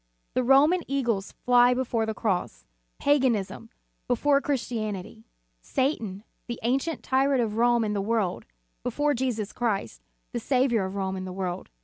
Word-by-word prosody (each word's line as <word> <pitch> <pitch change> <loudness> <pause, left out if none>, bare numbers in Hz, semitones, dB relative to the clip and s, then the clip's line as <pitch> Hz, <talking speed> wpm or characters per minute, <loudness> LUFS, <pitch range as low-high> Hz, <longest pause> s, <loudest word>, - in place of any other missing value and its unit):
The 255 - +2
Roman 285 +8 +5
eagles 235 -8 -1
fly 245 0 +4
before 235 -3 -1
the 220 - -2
cross, 185 - -2 0.3
paganism, 245 -6 +1 0.4
before 275 +3 +3
Chris 280 -4 -1
tianity; 210 - -5 0.4
Satan, 220 - -1 0.2
the 235 - -5
ancient 270 +7 0
tyrant 270 -1 +2
of 215 -1 -3
Rome 240 0 +4
and 210 -1 -1
the 200 - 0
world, 205 - -1 0.3
before 290 - 0
Jesus 235 -5 -2
Christ, 205 - -2 0.3
the - - -2
Saviour 250 -6 +2
of 190 +1 -5
Rome 190 -1 -2
and 185 0 -5
the - - -5
world. 180 -1 -4
235 Hz, 150 wpm, -26 LUFS, 200-265 Hz, 0.4 s, Roman